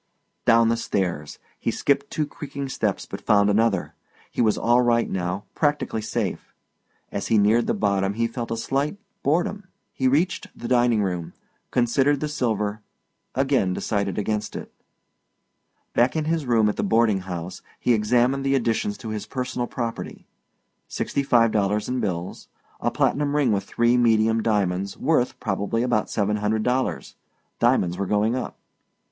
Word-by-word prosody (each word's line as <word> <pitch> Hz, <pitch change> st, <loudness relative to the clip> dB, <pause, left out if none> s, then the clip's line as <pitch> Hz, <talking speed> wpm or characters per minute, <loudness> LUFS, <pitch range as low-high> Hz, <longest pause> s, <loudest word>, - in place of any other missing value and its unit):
Down 115 Hz, -1 st, +5 dB
the 115 Hz, -, +1 dB
stairs. 90 Hz, -9 st, -2 dB, 0.2 s
He -, -, -1 dB
skipped -, -, 0 dB
two 155 Hz, -, -1 dB
crumbing 140 Hz, -2 st, -6 dB
steps -, -, -1 dB
but -, -, -7 dB
found 100 Hz, -1 st, +4 dB
another. 105 Hz, -3 st, +1 dB, 0.4 s
He -, -, -1 dB
was 110 Hz, -2 st, +3 dB
all 120 Hz, +1 st, +3 dB
right 120 Hz, -1 st, +2 dB
now, 90 Hz, +2 st, -2 dB
practically 145 Hz, -7 st, 0 dB
safe; 110 Hz, -, -3 dB, 0.6 s
as 100 Hz, -, -3 dB
he 115 Hz, -, +3 dB
neared 105 Hz, +3 st, +3 dB
the -, -, +1 dB
bottom 100 Hz, -1 st, 0 dB
he 115 Hz, +1 st, +1 dB
felt 115 Hz, 0 st, -4 dB
a 115 Hz, -, -2 dB
slight 140 Hz, -, -1 dB, 0.2 s
boredom. 180 Hz, +7 st, 0 dB, 0.3 s
He 130 Hz, -, +1 dB
reached 160 Hz, +8 st, +1 dB
the 120 Hz, -, -6 dB
dining 120 Hz, -3 st, +3 dB
room 90 Hz, -3 st, -3 dB, 0.4 s
considered 130 Hz, +4 st, +2 dB
the 150 Hz, -, -2 dB
silver 110 Hz, -7 st, -1 dB, 0.5 s
again 135 Hz, -8 st, +2 dB
decided 100 Hz, -2 st, -2 dB
against 105 Hz, 0 st, -2 dB
it. -, -, -7 dB, 1.2 s
Back 120 Hz, +5 st, +3 dB
in 155 Hz, -1 st, 0 dB
his 160 Hz, -3 st, -1 dB
room 115 Hz, -3 st, +4 dB
at 105 Hz, -, -1 dB
the -, -, 0 dB
boarding 110 Hz, -1 st, +3 dB
house 90 Hz, -1 st, -6 dB, 0.2 s
he 125 Hz, -, +2 dB
examined 120 Hz, +5 st, +2 dB
the 135 Hz, 0 st, +2 dB
additions 135 Hz, -, 0 dB
to 110 Hz, -, -7 dB
his 110 Hz, -1 st, -4 dB
personal 125 Hz, -2 st, -3 dB
property: 115 Hz, -2 st, -5 dB, 0.6 s
Sixty 140 Hz, -, -2 dB
five 120 Hz, -4 st, +4 dB
dollars 105 Hz, 0 st, 0 dB
in 125 Hz, 0 st, -1 dB
bills. 90 Hz, -4 st, -4 dB, 0.3 s
A -, -, +1 dB
platinum 145 Hz, 0 st, +1 dB
ring 140 Hz, -5 st, +3 dB
with 100 Hz, -1 st, 0 dB
three 120 Hz, +3 st, +2 dB
medium 115 Hz, -1 st, +3 dB
diamonds, 100 Hz, -3 st, 0 dB
worth, 135 Hz, -4 st, +1 dB
probably, 105 Hz, +2 st, -1 dB
about 120 Hz, -4 st, 0 dB
seven 105 Hz, 0 st, 0 dB
hundred 105 Hz, +1 st, 0 dB
dollars. 130 Hz, +2 st, -1 dB, 0.5 s
Diamonds 105 Hz, -8 st, +2 dB
were 100 Hz, -, -1 dB
going 105 Hz, +4 st, +2 dB
up. 130 Hz, -, -4 dB
115 Hz, 160 wpm, -24 LUFS, 105-130 Hz, 1.2 s, Down